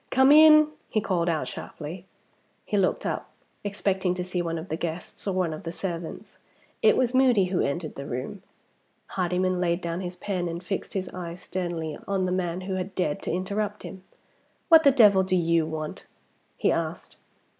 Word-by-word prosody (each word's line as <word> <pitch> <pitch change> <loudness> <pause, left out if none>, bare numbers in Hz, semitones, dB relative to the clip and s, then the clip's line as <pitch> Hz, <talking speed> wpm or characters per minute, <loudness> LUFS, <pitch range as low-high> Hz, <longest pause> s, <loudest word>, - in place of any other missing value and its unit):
"Come 265 +1 +5
in," 305 0 +8 0.2
he 215 - +1
called 180 -5 0
out 160 -2 -1
sharply. 170 +4 -8 0.6
He - - -2
looked 195 -2 +1
up, - - -3 0.3
expecting 195 -2 0
to 180 - -3
see 180 0 -2
one 165 -1 -2
of 160 +3 -7
the 160 - -1
guests 170 +4 -5
or 195 - 0
one 180 -4 0
of 155 - -7
the 165 - -5
servants. 175 -2 -6 0.4
It - - +5
was 250 -1 +1
Moody 255 -7 +4
who 180 - +2
entered 155 +3 -2
the 140 0 -7
room. 130 +10 -5 0.7
Hardyman 185 0 0
laid 170 -1 +1
down 170 0 -3
his 180 -1 -5
pen, 180 -2 -3
and 170 +1 -5
fixed 190 +1 -4
his 190 -2 -2
eyes 175 -1 -7
sternly 170 -4 -4
on 195 -2 0
the 180 - -1
man 180 -1 -1
who 190 +1 -4
had 185 +1 -5
dared 150 -5 -1
to - - -3
interrupt 200 +3 -2
him. 190 -1 -9 0.7
"What 325 -1 +9
the 290 - +6
devil 210 -7 +6
do 185 0 +1
you 170 -2 +2
want?" 155 -1 -6 0.5
he - - +2
asked. - - -3
185 Hz, 190 wpm, -26 LUFS, 170-195 Hz, 0.7 s, What